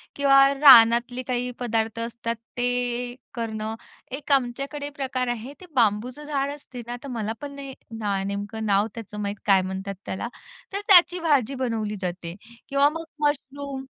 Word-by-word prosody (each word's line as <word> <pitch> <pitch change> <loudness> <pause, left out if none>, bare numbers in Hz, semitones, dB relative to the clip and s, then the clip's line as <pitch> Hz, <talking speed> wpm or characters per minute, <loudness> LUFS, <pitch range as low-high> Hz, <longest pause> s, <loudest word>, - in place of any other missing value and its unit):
किंवा 275 -1 +5 0.2
रानातले 245 -3 +7
काही 250 -1 -1
पदार्थ 225 -2 -1
असतात 230 0 -3 0.2
ते 245 0 -1 0.2
करणं 220 -2 -4 0.4
एक 295 - -8
आमच्याकडे 275 +2 0
प्रकार 265 -3 -3
आहे 240 +3 -4
ते - - -10
बांबूचं 240 +4 +1
झाड 280 -1 -1
असते 280 -4 -9
ना 240 - -4
तर - - -7
मला 225 -3 -3
पण 290 -1 -6
नाही 275 -1 -8 0.3
ना 200 -2 -1
नेमकं 205 +2 -4
नाव 205 +1 +3
त्याचं 210 -2 -8
माहीत 200 0 -2
काय 195 -2 +5
म्हणतात 190 +1 -5
त्याला 190 - -4 0.5
तर 400 - -1
त्याची 360 -2 +7
भाजी 280 -6 +2
बनवली 225 -5 -2
जाते 175 -2 -4 0.3
किंवा 280 +1 +4
मग 325 +2 -6 0.2
मशरूम 280 -1 -4
245 Hz, 155 wpm, -25 LUFS, 220-275 Hz, 0.5 s, रानातले